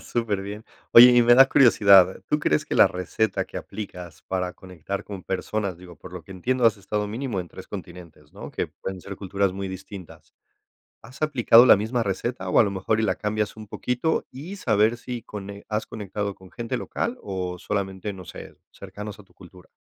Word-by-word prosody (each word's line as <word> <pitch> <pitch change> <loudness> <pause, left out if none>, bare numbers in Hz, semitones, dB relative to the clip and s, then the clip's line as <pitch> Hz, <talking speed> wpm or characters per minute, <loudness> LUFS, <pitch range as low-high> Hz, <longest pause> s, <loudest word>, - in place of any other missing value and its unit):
Superbién. 105 -2 -3 0.3
Oye, 125 +1 +11
y 120 0 +6
me 120 +1 +6
da 135 +1 +7
curiosidad. 100 -8 +6
¿Tú 150 - +2
crees 75 - +1
que - - -4
la - - +7
receta 90 +4 -1
que - - -11
aplicas 90 -5 -8
para 90 -1 -3
conectar 95 +1 -7
con 100 -3 -8
personas? 100 0 -3
Digo, 90 -2 -13
por 85 - -13
lo 90 -2 -8
que - - -19
entiendo, 125 +7 -1
has 110 -3 +3
estado 105 +1 -3
mínimo 115 -1 -3
en 90 - -8
3 - - -11
continentes, 85 -4 -10
¿no? - - -9
Que - - -3
pueden 95 -1 -7
ser 100 +2 -8
culturas 100 0 -1
muy 95 0 -5
distintas. 95 -1 -10 0.7
¿Has 130 +5 -13
aplicado 125 -5 +6
la - - +8
misma 110 +4 -1
receta 100 -1 -3
o - - +3
a - - +7
lo 100 - -1
mejor 100 +3 -1
y - - 0
la 110 - +1
cambias 105 0 -2
un 110 -1 -10
poquito 125 +9 -1
y 160 +10 -8
saber 110 - +2
si 120 -1 -7
cone 100 0 -9
has 105 0 -2
conectado 100 -1 -5
con 95 -1 -17
gente 120 +1 -4
local 235 - -3
o 90 -2 -4
solamente, 100 0 -3
no 95 -1 -10
sé, - - -10 0.2
cercanos 100 +2 -9
a - - -13
tu 95 - -27
cultura? 90 -1 -16
100 Hz, 200 wpm, -24 LUFS, 95-115 Hz, 0.7 s, Oye